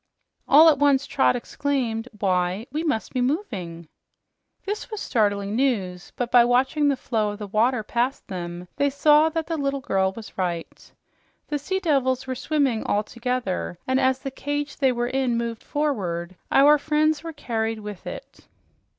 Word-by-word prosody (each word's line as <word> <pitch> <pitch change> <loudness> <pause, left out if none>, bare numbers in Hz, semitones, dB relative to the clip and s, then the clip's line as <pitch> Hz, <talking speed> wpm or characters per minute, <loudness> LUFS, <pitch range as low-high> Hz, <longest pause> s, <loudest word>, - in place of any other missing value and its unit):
All 305 +4 +8
at 300 -4 +5
once 280 -1 +3
Trot 270 - +2
exclaimed, 245 -2 -2
"Why, 185 +1 0
we 305 +4 -2
must 295 -9 -2
be 255 - 0
moving!" 195 - -3 0.8
This 415 +4 -4
was 430 -2 -5
startling 205 - 0
news, 195 -9 -1
but 245 -1 -3
by 245 -1 +7
watching 260 +5 +2
the 280 -2 +2
flow 220 -4 -1
of 205 -2 -8
water 230 +2 +2
past 245 +5 -2
them 175 -2 -6
they 285 0 +2
saw 300 +3 +4
that 325 0 -2
the 330 0 -3
little 275 -1 -1
girl 190 -6 0
was 220 -3 -10
right. 175 -3 -4 0.6
The 295 -1 -1
sea 380 +7 -2
devils 265 -7 +1
were 260 - -3
swimming, 270 -3 0
all 205 +1 0
together, 235 -6 -3
and 260 0 +2
as 260 -1 +2
the 270 0 -6
cage 290 +2 -4
they 265 -2 +3
were 240 -1 -1
in 255 -2 0
moved 235 -1 -3
forward, 185 - -2 0.2
our 290 +2 +6
friends 310 +1 +1
were 330 - -5
carried 225 -6 -3
with 205 -3 -8
it. - - -9
255 Hz, 170 wpm, -24 LUFS, 210-285 Hz, 0.8 s, All